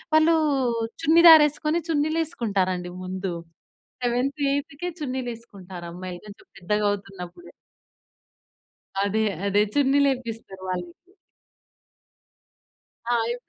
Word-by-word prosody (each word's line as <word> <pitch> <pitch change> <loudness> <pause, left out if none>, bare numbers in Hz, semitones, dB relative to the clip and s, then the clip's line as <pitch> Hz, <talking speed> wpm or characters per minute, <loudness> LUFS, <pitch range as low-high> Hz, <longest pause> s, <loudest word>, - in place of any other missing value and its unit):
వాళ్ళు 320 +1 +5 0.7
చున్ని 330 +3 +5
దార 320 - +11
వేసుకొని, 305 +3 -1
చున్నీలు 310 +1 +1
వేసుకుంటారండి. 190 - -2
ముందు 185 0 -4 0.7
సెవెంత్, 250 +4 0
ఎయిథ్‌కే 285 +4 -3
చున్నీలు 260 -3 -3
వేసుకుంటారు 190 -6 -11
అమ్మాయిలు 180 -1 -7
కొంచెం 205 - -14
పెద్దగా 210 +3 -1
అవుతున్నప్పుడే. 195 - -8 1.5
అదే 215 +2 0 0.2
అదే 205 +1 +3
చున్నీలు 280 0 +4
వేపిస్తారు 225 -6 -7
వాళ్ళకి. 180 - -7 2.0
ఆ! - - +3
అవే 235 +1 -1
230 Hz, 100 wpm, -24 LUFS, 190-290 Hz, 2.0 s, దార